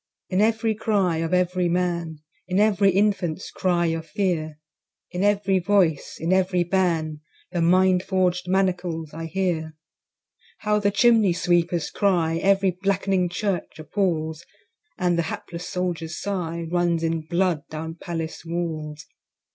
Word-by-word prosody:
In 185 +1 +1
every 225 +1 +2
cry 200 -6 +1
of 165 0 -2
every 180 -1 +1
Man, 170 -3 -1 0.3
In 185 +1 +1
every 205 -2 +4
Infant's 195 -3 0
cry 175 -2 +1
of 165 0 -2
fear, 165 -6 -1 0.5
In 180 +2 -2
every 200 -2 +2
voice, 180 -5 +1
in 165 +3 +1
every 185 -1 +2
ban, 165 -4 0 0.3
The 175 -2 -1
mind 185 +2 +4
forg'd 185 -1 0
manacles 180 -4 -1
I 165 0 -5
hear. 160 -3 -2 0.9
How 210 -1 +2
the 205 -1 +2
Chimney 210 -2 +4
sweepers 175 -1 +1
cry 170 -5 +1
Every 195 0 +3
black'ning 195 0 0
Church 190 -2 -3
appalls; 160 -2 -2 0.5
And 175 -2 +1
the 165 - -1
hapless 170 +1 -6
Soldier's 170 -2 -3
sigh 170 -4 -3
Runs 175 -2 +1
in 165 0 0
blood 175 -2 +1
down 160 +1 -5
Palace 165 -1 -5
walls. 160 -3 -4
180 Hz, 135 wpm, -24 LUFS, 165-190 Hz, 0.9 s, every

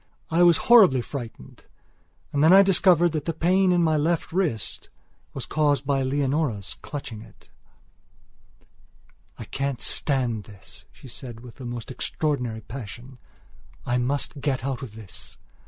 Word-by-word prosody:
I 165 +2 +3
was 175 -2 +6
horribly 200 - +7
frightened 120 - -9 0.7
and 145 +1 +2
then 160 - +6
I 195 +1 +9
discovered 180 -3 +4
that 150 -2 -3
the 165 - -2
pain 185 +3 +3
in 175 -1 +3
my 160 -1 +2
left 165 +2 0
wrist 165 - -2 0.5
was - - -5
caused 145 -2 +1
by 135 -1 +1
Leonora's 135 -5 -1
clutching 130 -7 -7
it: - - -18 1.9
"I - - -7
can't 135 -2 -3
stand 125 -7 0
this," 100 -4 -12
she - - -15
said 120 -2 -8
with 125 +2 -13
a - - -7
most 120 0 -6
extraordinary 125 -5 -2
passion; 125 +2 -9 0.7
"I 125 +1 +1
must 140 +3 -2
get 135 -3 -1
out 135 -2 -3
of 115 -6 -8
this." 110 -5 -9
135 Hz, 145 wpm, -25 LUFS, 120-160 Hz, 1.9 s, I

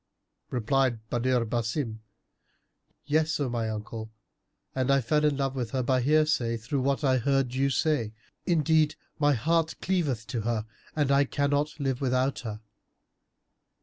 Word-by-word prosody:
Replied 120 -2 0
Badr 125 0 +1
Basim, 115 +1 -2 1.1
"Yes, 155 +1 +1
O 140 -3 0
my 115 -2 -1
uncle, 110 +1 -5 0.6
and 130 0 -1
I 140 0 +5
fell 150 +5 +1
in 150 -2 +2
love 135 -1 -1
with 125 -4 -2
her 130 +2 -1
by 130 +1 +2
hearsay 145 -4 +2
through 125 +5 -2
what 140 +3 0
I 130 -2 +3
heard 135 -1 +1
you 135 +1 +1
say. 135 -6 +1 0.4
Indeed, 160 -2 +3 0.2
my 145 -1 +4
heart 160 +6 +1
cleaveth 150 - -1
to 115 +1 -2
her 110 -1 -1 0.3
and 145 -3 +1
I 140 +1 +4
cannot 145 +2 0
live 135 -2 -1
without 130 +1 +1
her." 110 -3 -6
135 Hz, 150 wpm, -28 LUFS, 120-145 Hz, 1.1 s, I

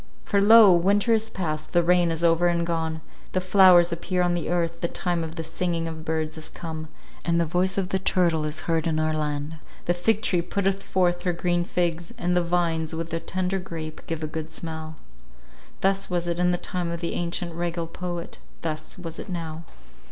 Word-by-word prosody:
"For 200 -1 +2
lo! 215 -1 +8
winter 200 +6 +3
is 220 0 +1
past, 155 -7 -4
the 175 -1 +4
rain 175 0 +4
is 165 +1 -2
over 170 +1 +4
and 170 -1 +1
gone; 160 -1 -2 0.3
the 185 - +2
flowers 185 -2 +6
appear 180 +2 -1
on 175 0 +2
the 170 -3 -2
earth, 170 -1 -1
the 170 - +1
time 175 -1 -1
of 160 0 -6
the 165 - -4
singing 165 0 -2
of 160 -1 -6
birds 160 0 -2
is 155 - -7
come, 160 -2 -6 0.4
and 170 0 +1
the 170 - +2
voice 180 +4 +2
of 190 -2 0
the 190 - +1
turtle 170 -4 +2
is 155 +1 0
heard 165 -1 0
in 155 -1 0
our 155 0 +1
land; 150 0 -3 0.3
the 175 - +2
fig 215 +5 +1
tree 180 -5 +2
putteth 195 +2 -1
forth 175 -2 +1
her 180 -1 0
green 175 0 0
figs, 175 +3 -2
and 180 -6 0
the 180 - +4
vines, 170 -2 0
with 165 0 -4
the 165 - -1
tender 185 +2 -1
grape, 160 -4 -7
give 165 -1 -3
a - - -1
good 160 0 -5
smell." 160 -1 -6 0.9
Thus 195 0 +1
was 175 -1 -1
it 170 0 -2
in 180 0 +3
the 175 - +1
time 180 -1 -3
of 170 0 -4
the 170 -1 -3
ancient 170 0 -3
regal 170 0 -2
poet; 175 +1 -6 0.2
thus 155 +1 -4
was 165 -3 -7
it - - -7
now. 165 -2 -5
170 Hz, 210 wpm, -25 LUFS, 160-180 Hz, 0.9 s, lo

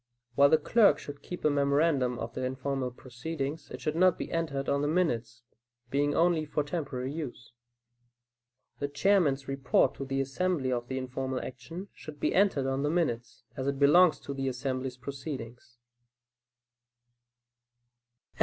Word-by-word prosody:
While 140 +3 +6
the 160 - +6
clerk 225 +2 +4
should 145 -1 -9
keep 180 - -7
a - - +6
memorandum 140 -3 +2
of 115 -1 -5
the 130 - -4
informal 130 0 -2
proceedings, 135 +5 -5
it - - -8
should 155 - -1
not 180 +1 +4
be - - -5
entered 145 -5 -2
on 140 - +1
the 145 - +1
minutes, 145 -9 0 0.5
being 145 +1 +1
only 170 -1 +3
for 150 0 -1
temporary 140 -4 -3
use. 130 -7 -7 1.3
The 145 - -1
Chairman's 145 -3 +2
report 135 -1 +2
to 135 - -4
the 135 0 -2
assembly 135 +1 0
of 120 -1 -2
the 130 - -3
informal 130 0 -3
action, 165 +12 -8
should 150 -1 -10
be - - +1
entered 190 -8 +3
on 135 0 0
the 145 - +1
minutes, 145 -8 -1
as 130 0 -3
it 140 0 0
belongs 155 +5 +6
to 140 - -5
the 135 -1 -2
assembly's 130 0 -3
proceedings. 130 -3 -7
140 Hz, 155 wpm, -29 LUFS, 130-155 Hz, 1.3 s, While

